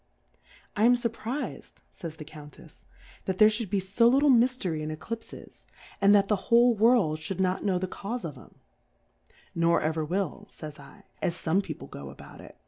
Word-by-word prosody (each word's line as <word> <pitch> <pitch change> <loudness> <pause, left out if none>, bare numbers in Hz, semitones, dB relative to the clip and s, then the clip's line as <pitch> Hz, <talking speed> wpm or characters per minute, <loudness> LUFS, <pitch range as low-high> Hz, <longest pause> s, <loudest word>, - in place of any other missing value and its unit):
I 210 - +3
am 245 +1 +6
iuvpviz^dy 240 +3 -4 0.2
fays 165 -5 -7
the 155 - -10
Countefs^ 150 -1 -14 0.4
that 190 -1 -2
there 215 +1 +7
fliould 220 -2 -2
be 200 - +1
fo* 200 +5 +2
little 275 +4 +5
Miftery 235 -10 +2
in 155 - -4
E 155 - -4
clipfes, 225 +8 -9 0.3
and 200 +1 +6
that 200 -1 +4
the 210 - +2
whole 240 +1 +6
World 215 -8 +3
fliould 185 +3 -4
not 185 0 0
know 190 -3 +1
tlxe 185 0 -3
Caufe 230 +4 -4
of 150 -4 -5
'em* - - -16 1.0
!N' 170 - -1
or 170 0 +4
ever 160 +1 -1
will, 195 +5 -3
/ - - -33
Jyj" 145 -3 -11
/, - - -37
as 170 - 0
fome 175 +3 +1
People - - -8
go 70 -1 -9
about 70 - -13
it. - - -14
195 Hz, 195 wpm, -28 LUFS, 160-230 Hz, 1.0 s, there